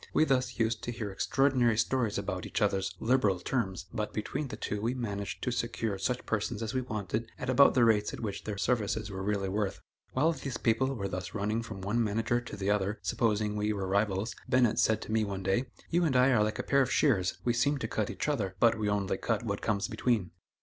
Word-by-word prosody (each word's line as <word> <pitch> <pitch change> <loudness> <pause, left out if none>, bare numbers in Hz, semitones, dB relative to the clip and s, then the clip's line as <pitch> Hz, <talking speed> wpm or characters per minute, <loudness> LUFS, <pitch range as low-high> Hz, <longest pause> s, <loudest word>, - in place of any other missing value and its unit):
We - - +6
thus 130 -4 +1
used 115 0 0
to 120 - -3
hear 110 -4 -4
extraordinary 125 +2 +2
stories 115 -3 +1
about 95 -2 -3
each - - -2
other's 95 -2 0
"liberal 110 -6 +2
terms," 95 -3 -2
but 105 -3 -3
between 135 +7 -2
the - - -6
two 105 0 -3
we 120 +4 0
managed 100 -5 -4
to 125 - 0
secure 115 -4 -2
such 125 +6 -1
persons 110 +1 -2
as 110 - -3
we 130 - +1
wanted 110 -1 -3
at 130 - -2
about 140 +2 +6
the 125 -2 +5
rates 105 -2 +3
at - - -7
which 105 -4 -4
their 105 -2 -3
services 110 -1 0
were 95 0 -5
really 100 0 -1
worth. 100 0 -1 0.3
While 155 +6 +3
these 135 -6 -4
people 130 +4 +1
were 100 -4 -3
thus 90 +1 -5
running 105 +2 0
from 110 -4 -7
one 110 +5 +1
manager 115 +3 0
to 120 - -8
the 100 +1 0
other, 105 +1 0
supposing 105 -2 +1
we 105 +1 0
were 100 -2 -3
rivals, 100 +2 0 0.2
Bennett 125 -3 +3
said 110 - +2
to - - -7
me 110 0 +2
one 100 -2 -4
day: 95 +7 +1 0.3
"You 175 +1 +3
and 150 -6 +1
I 125 +2 +5
are 110 -4 +4
like 110 0 -1
a - - -2
pair 140 0 +3
of 125 -2 +1
shears; 100 -12 +2
we 120 - +3
seem 140 +5 +2
to 115 - -3
cut 110 -2 -1
each - - -3
other, 105 -11 -1
but 115 -1 +4
we 105 -1 0
only 100 -2 0
cut - - -1
what - - -3
comes 100 -1 0
between." 110 -6 0
110 Hz, 235 wpm, -30 LUFS, 100-125 Hz, 0.3 s, We